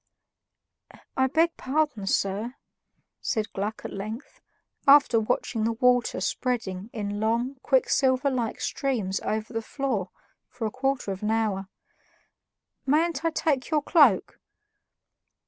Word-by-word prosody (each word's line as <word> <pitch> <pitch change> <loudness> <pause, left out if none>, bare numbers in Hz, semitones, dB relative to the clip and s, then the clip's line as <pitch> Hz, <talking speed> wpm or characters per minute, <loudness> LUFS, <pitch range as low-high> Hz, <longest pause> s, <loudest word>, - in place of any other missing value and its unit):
"I 260 0 +3
beg 325 +5 +2
pardon, 270 -7 -1
sir," 205 +6 -1 0.7
said 220 -3 -2
Gluck 210 +3 -3
at - - -5
length, 215 +6 -7 0.5
after 275 -4 +7
watching 220 +1 -1
the 230 +1 +1
water 245 +1 +2
spreading 220 -6 -2
in 205 -2 -4
long, 235 +5 0
quicksilver 265 0 +2
like 240 -4 -2
streams 220 -9 -1
over 215 +2 -3
the 225 - -1
floor 225 -6 -2 0.4
for 245 -2 -5
a 215 - -1
quarter 260 -4 -1
of 190 - -5
an 210 - -1
hour; 215 -4 0 1.2
"mayn't 310 +2 +1
I 330 - +3
take 290 -5 0
your 305 -2 +1
cloak?" 290 - +4
240 Hz, 125 wpm, -26 LUFS, 215-275 Hz, 1.2 s, after